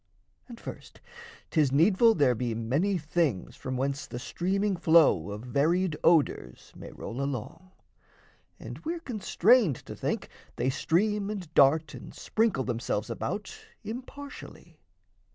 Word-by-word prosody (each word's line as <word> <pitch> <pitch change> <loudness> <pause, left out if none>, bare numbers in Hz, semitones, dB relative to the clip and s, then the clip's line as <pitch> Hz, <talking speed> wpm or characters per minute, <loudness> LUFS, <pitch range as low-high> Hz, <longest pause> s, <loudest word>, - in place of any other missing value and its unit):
And 235 -2 -11
first, - - -10 0.5
'tis 150 -5 +2
needful 195 - +5
there 140 -4 +3
be 120 0 -2
many 145 - 0
things 150 - -1
From 130 -1 -5
whence 140 +2 -2
the - - -7
streaming 185 - -1
flow 160 - +4
of 105 +1 -6
varied 155 +7 +1
odours 145 - +1
May - - -10
roll 125 +4 -6
along, 140 +7 -5 0.9
and - - -9
we're 335 +2 -3
constrained 220 - +3
to - - -8
think - - -3 0.3
They 130 - 0
stream 205 +8 0
and 185 -7 -6
dart 145 +2 +4
and - - -10
sprinkle 220 -11 0
themselves 120 -2 -2
about - - -4 0.3
Impartially. 245 - -9
160 Hz, 130 wpm, -28 LUFS, 130-200 Hz, 0.9 s, needful